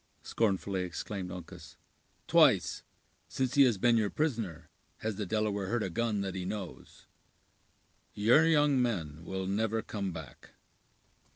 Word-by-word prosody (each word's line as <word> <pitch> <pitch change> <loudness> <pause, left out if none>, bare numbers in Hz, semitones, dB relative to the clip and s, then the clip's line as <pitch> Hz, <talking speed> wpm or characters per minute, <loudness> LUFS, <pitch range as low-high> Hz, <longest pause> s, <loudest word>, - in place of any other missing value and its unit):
scornfully 100 -3 0
exclaimed 90 +1 -5
Uncas; 90 -2 -10 0.5
"twice, - - +4 0.5
since 130 -1 -2
he 145 - +5
has 120 -5 +2
been 120 +4 +3
your 105 -2 +1
prisoner, 110 - -2 0.3
has 110 -1 -2
the 105 -3 -3
Delaware 105 -1 -1
heard 115 +1 0
a 95 - -3
gun 110 +2 -1
that 95 -1 -3
he 95 - -4
knows. 95 -1 -7 1.1
Your 120 +10 +5
young 145 -4 +4
men 85 -10 -2
will 95 +2 -4
never 110 +3 -1
come 100 -3 -4
back!" 80 -6 -11
100 Hz, 135 wpm, -31 LUFS, 90-115 Hz, 1.1 s, he